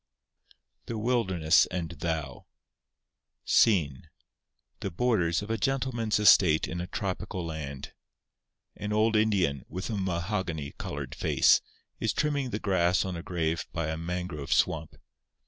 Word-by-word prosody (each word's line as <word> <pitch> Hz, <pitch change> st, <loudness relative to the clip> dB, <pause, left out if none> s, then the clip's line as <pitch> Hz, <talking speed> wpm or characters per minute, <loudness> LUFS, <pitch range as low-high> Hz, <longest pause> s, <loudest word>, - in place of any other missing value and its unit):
The 115 Hz, -, -4 dB
Wilderness 95 Hz, -8 st, +3 dB
and 85 Hz, -3 st, -4 dB
Thou 80 Hz, -5 st, -4 dB, 1.0 s
SCENE—The 85 Hz, -, -1 dB
Borders 90 Hz, -3 st, +1 dB
of 110 Hz, -, -5 dB
a 115 Hz, -, -1 dB
Gentleman's 125 Hz, -4 st, 0 dB
Estate 90 Hz, -6 st, +5 dB
in 90 Hz, -1 st, -4 dB
a 90 Hz, -, -5 dB
Tropical 95 Hz, -1 st, -4 dB
Land. 75 Hz, -4 st, -6 dB, 0.8 s
An 105 Hz, 0 st, -4 dB
old 110 Hz, +1 st, +2 dB
Indian, 95 Hz, -10 st, +2 dB
with 95 Hz, +6 st, -5 dB
a -, -, -1 dB
mahogany 85 Hz, -4 st, -2 dB
coloured 70 Hz, -3 st, -5 dB
face, -, -, +4 dB, 0.4 s
is -, -, 0 dB
trimming 145 Hz, -3 st, 0 dB
the 105 Hz, -, -2 dB
grass 90 Hz, -4 st, +2 dB
on 95 Hz, -2 st, -4 dB
a 85 Hz, -, -5 dB
grave 85 Hz, -2 st, -2 dB
by 85 Hz, -2 st, -2 dB
a 80 Hz, -, -2 dB
mangrove 85 Hz, -3 st, -4 dB
swamp. 80 Hz, -1 st, +1 dB
90 Hz, 130 wpm, -28 LUFS, 80-105 Hz, 1.0 s, Estate